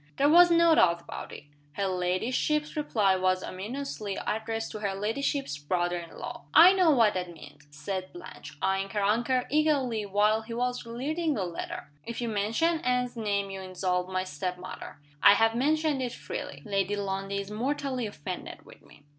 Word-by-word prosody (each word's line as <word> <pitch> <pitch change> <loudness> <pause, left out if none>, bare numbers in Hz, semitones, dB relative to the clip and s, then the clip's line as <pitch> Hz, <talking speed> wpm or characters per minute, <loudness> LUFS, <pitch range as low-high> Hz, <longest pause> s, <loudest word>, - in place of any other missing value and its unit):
There 285 - +4
was 350 +2 +8
no 335 -1 +5
doubt 170 - +4
about - - -8
it. - - -9 0.3
Her 200 - -1
ladyship's 195 +12 0
reply 215 -10 +2
was 185 0 +1
ominously 210 0 -5
addressed 225 +1 -2
to 215 - -6
her 200 -2 -2
ladyship's 225 - -2
brother 175 +3 -1
in 170 -1 -11
law. 240 -1 -7
"I 350 +4 +9
know 370 -3 +4
what 230 -8 +4
that 180 -1 -3
means." 150 -2 -14
said 185 +5 -5
Blanche, 350 - -11
eying 195 +1 +1
her 205 -2 0
uncle 240 +5 +2
eagerly 275 -8 +1
while 210 +2 +2
he 230 +1 -7
was 245 0 -2
reading 300 +7 -2
the 195 - -1
letter. 170 -3 -6
"If 235 - -6
you 240 -1 -2
mention 225 +11 +1
Anne's 250 -2 0
name 200 -3 -1
you 195 0 -6
insult 185 -1 -2
my 185 0 -1
step 180 +1 -4
mother. 185 +1 -9 0.2
I 200 - +8
have 225 +2 +3
mentioned 300 +3 +1
it 245 -2 -3
freely. 140 -1 -7
Lady 200 0 0
Lundie 195 0 -3
is 200 +1 -6
mortally 260 +1 -2
offended 180 -2 -7
with - - -16
me." 145 - -19
210 Hz, 180 wpm, -28 LUFS, 185-255 Hz, 0.3 s, I